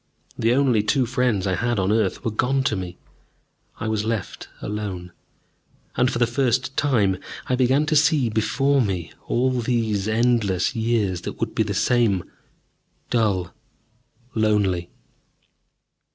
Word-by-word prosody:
The 115 +2 +2
only 130 -6 +3
two 130 +5 +1
friends 120 -5 0
I 95 - 0
had 120 +5 0
on 95 0 +1
earth 110 +1 0
were 115 - 0
gone 130 +5 +1
to 115 - +1
me. 90 -2 -6 0.8
I - - -3
was 110 -1 0
left 110 -3 -4
alone. 100 -4 -5 0.8
And, 125 +1 +3
for - - -2
the 120 - +3
first 130 +2 0
time, 105 -10 +2 0.3
I 130 - 0
began 130 +4 +3
to 155 0 0
see 150 -3 +4
before 135 +6 +1
me 95 -7 -2 0.2
all 130 +2 +1
these 115 -5 0
endless 110 -3 +1
years 110 -6 0
that - - -5
would - - -2
be - - 0
the - - -1
same, 115 -7 +2 0.9
dull, 100 -7 +1 0.8
lonely. 105 -5 +1
115 Hz, 140 wpm, -23 LUFS, 100-125 Hz, 0.9 s, see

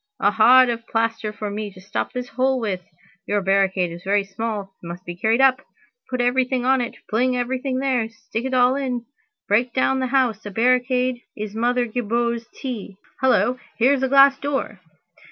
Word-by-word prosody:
A 205 - +3
hod 250 +4 +6
of 230 -1 -4
plaster 225 -1 -1
for 210 -1 -5
me 210 0 -4
to 185 - -14
stop 185 - -4
this 250 0 -5
hole 260 -1 +1
with! 200 -6 -2 0.5
Your 205 - +1
barricade 190 -2 +1
is 170 +1 -9
very 200 +1 +1
small. 200 0 -5
It 170 - -10
must 175 +2 -8
be 175 - -6
carried 220 +7 +1
up. 260 -1 +4 0.5
Put 255 -1 -1
everything 250 0 +1
on 265 0 +3
it, 240 - -4
fling 250 +3 +1
everything 255 +1 -2
there, 255 -4 0
stick 225 +1 -6
it 265 - -3
all 250 +1 +4
in. 250 -4 -3 0.4
Break 235 +4 +1
down 265 0 +2
the 260 - -1
house. 245 -5 +1
A 205 - -6
barricade 250 +3 +1 0.2
is 210 -1 -5
Mother 240 +2 +1
Gibou's 235 0 -2
tea. 220 -7 -7 0.2
Hullo, 255 -1 +2 0.2
here's 265 +3 +3
a 265 - +2
glass 275 0 +6
door." 270 -8 -3
240 Hz, 185 wpm, -22 LUFS, 210-255 Hz, 0.5 s, hod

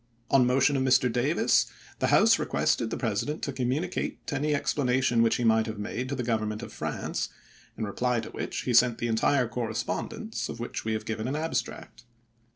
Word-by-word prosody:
On 130 -3 +5
motion 135 +3 +3
of 135 - +1
Mr. 130 -1 +3
Davis 120 - +2 0.3
the - - +1
House - - +5
requested 115 - 0
the - - -3
President 120 +6 -2
to 140 - -2
communicate 135 +8 -2 0.2
any 145 +2 0
expla 145 0 0
nation 125 -2 +2
which 115 -1 +3
he 125 - -1
might 110 -1 +3
have 110 -1 -5
made 115 +5 -4
to 140 - -2
the 125 - -3
Govern 110 -2 0
ment 110 +2 -5
of - - -8
France, - - -3 0.5
in - - -3
reply 125 +4 0
to - - -9
which - - -4
he 125 - -1
sent 120 0 +5
the - - -3
entire 120 +3 +2
correspondence, 115 0 -3
of 115 - -6
which 120 - -4
we 110 - -1
have 110 - -3
given 110 +1 -3
an 135 - -2
abstract. 155 -6 -4
120 Hz, 200 wpm, -28 LUFS, 115-130 Hz, 0.5 s, On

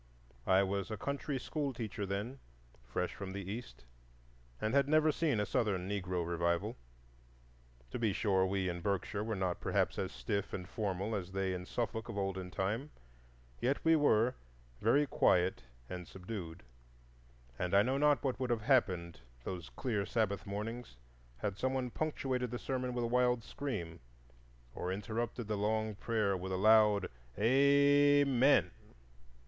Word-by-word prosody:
I 95 +1 +5
was 100 0 -2
a 110 - -4
country 140 +4 -2
schoolteacher 120 -8 -3
then, 105 +8 -3 0.4
fresh - - -2
from 95 -1 -6
the 100 -1 -5
East, 115 - -8 0.7
and 110 - -1
had 140 -1 +4
never 155 +1 +4
seen 145 -7 +1
a 105 - +1
Southern 100 -8 0
Negro 90 -3 -2
revival. 85 +5 0 1.2
To - - -3
be 110 -3 +2
sure, 95 -2 +2
we 95 0 0
in 85 -1 -3
Berkshire 100 +2 -1
were 110 0 -2
not 95 -2 -1
perhaps - - 0
as - - -2
stiff 65 +12 -3
and 90 -1 -4
formal 100 0 -2
as 95 -2 -5
they 95 -1 0
in 90 0 -5
Suffolk 115 -1 -3
of 110 - -5
olden 95 -2 -2
time; 105 +10 -2 0.7
yet 135 +3 +1
we 165 0 +6
were 125 -5 +4 0.5
very 140 +7 +4
quiet 90 - +2 0.2
and 90 -1 -6
subdued, 90 - -7 1.0
and 90 +2 0
I 100 - +7
know 130 +4 0
not 145 -1 +4
what 130 -3 -1
would 130 -1 -1
have 120 -2 +1
happened 90 - +2 0.2
those 85 -4 -5
clear 100 - -2
Sabbath 100 -5 0
mornings 105 - -5 0.4
had 100 +7 -3
some 130 +1 0
one 125 -2 -2
punctuated 130 -5 -1
the 120 - -3
sermon 125 -1 -3
with 120 - 0
a - - +1
wild 125 -2 +3
scream, 100 -15 -5 0.7
or 90 - -3
interrupted 110 +3 -3
the 105 -1 -1
long 110 +1 0
prayer 105 -1 0
with 95 +1 -4
a 95 - 0
loud 105 -1 +5 0.3
Amen! 140 -2 +5
105 Hz, 155 wpm, -34 LUFS, 95-125 Hz, 1.2 s, I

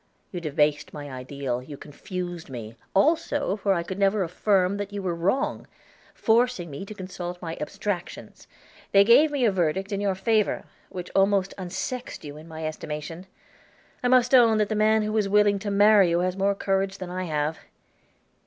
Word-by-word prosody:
You 175 - -5
debased 150 -1 0
my 145 -1 -7
ideal, 130 -1 -4
you 140 +2 -10
confused 175 +3 -7
me, 115 -3 -8 0.2
also, 290 - +2
for 200 -1 +1
I 170 - -1
could 190 +3 -6
never 200 0 +2
affirm 185 +2 +1
that 205 0 -5
you 205 - -4
were 185 -3 -2
wrong; 195 +12 -1 0.5
forcing 225 -7 +1
me 140 +7 -6
to 215 - -8
consult 180 -2 -6
abstractions, 175 +3 -5 0.5
they 200 0 +8
gave 260 +8 +6
a 270 -5 +2
verdict 190 +1 -1
in 200 0 -2
your 200 -2 0
favor, 215 +2 +1 0.3
which 180 -1 -7
almost 195 0 +2
unsexed 195 +7 -5
you 145 0 -8
in 155 +2 -12
my 160 -1 -6
estimation. 155 +3 -6 0.7
I 250 - +1
must 250 0 +4
own 230 -4 +6
that 210 -1 +1
the - - 0
man 215 +1 +3
who 215 +1 -2
is 205 -2 +1
willing 205 0 +4
to 205 +1 -4
marry 205 -2 +5
you 170 +1 +1
has 185 0 -1
more 200 +1 +1
courage 195 0 -1
than 180 -1 -7
I 185 0 -3
have. 155 -1 -2
190 Hz, 175 wpm, -25 LUFS, 170-210 Hz, 0.7 s, they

